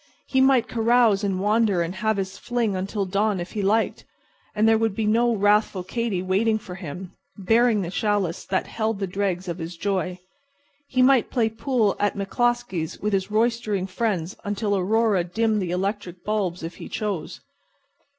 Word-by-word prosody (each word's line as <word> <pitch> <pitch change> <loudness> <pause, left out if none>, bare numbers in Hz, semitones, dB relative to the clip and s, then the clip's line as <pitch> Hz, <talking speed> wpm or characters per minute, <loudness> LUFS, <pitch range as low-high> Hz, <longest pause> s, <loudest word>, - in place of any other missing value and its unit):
He 265 - +2
might 265 -3 +4
carouse 230 -3 +3
and 195 -2 0
wander 210 -3 +2
and 170 +2 -4
have 220 +2 0
his 190 0 -3
fling 235 -4 -1
until 195 +2 -2
dawn 200 +1 0
if 175 - -6
he 210 - -3
liked; 215 +3 +1 0.5
and 215 +1 +3
there 225 0 +4
would 225 -3 0
be 220 - -1
no 230 +2 +3
wrathful 205 -2 +2
Katy 205 -2 -2
waiting 210 +4 +2
for 190 -4 -9
him, 180 0 -7 0.3
bearing 225 +1 +3
the 170 - -5
chalice 205 -5 0
that 190 - -1
held 220 -1 -2
the 195 - -2
dregs 190 -1 -2
of 170 - -4
his 165 +1 -6
joy. 185 -1 -1 0.7
He 255 -2 +2
might 260 -2 +4
play 230 -3 +1
pool 225 -2 0
at 205 - +1
McCloskey's 200 -4 -1
with 210 0 -2
his 190 0 0
roistering 220 -3 0
friends 190 -3 -2
until 205 0 -1
Aurora 205 0 +2
dimmed 215 +4 0
the 180 - -3
electric 185 -1 -3
bulbs 195 -5 -1
if 165 +1 -6
he - - -9
chose. 200 -7 -4
205 Hz, 175 wpm, -24 LUFS, 185-225 Hz, 0.7 s, might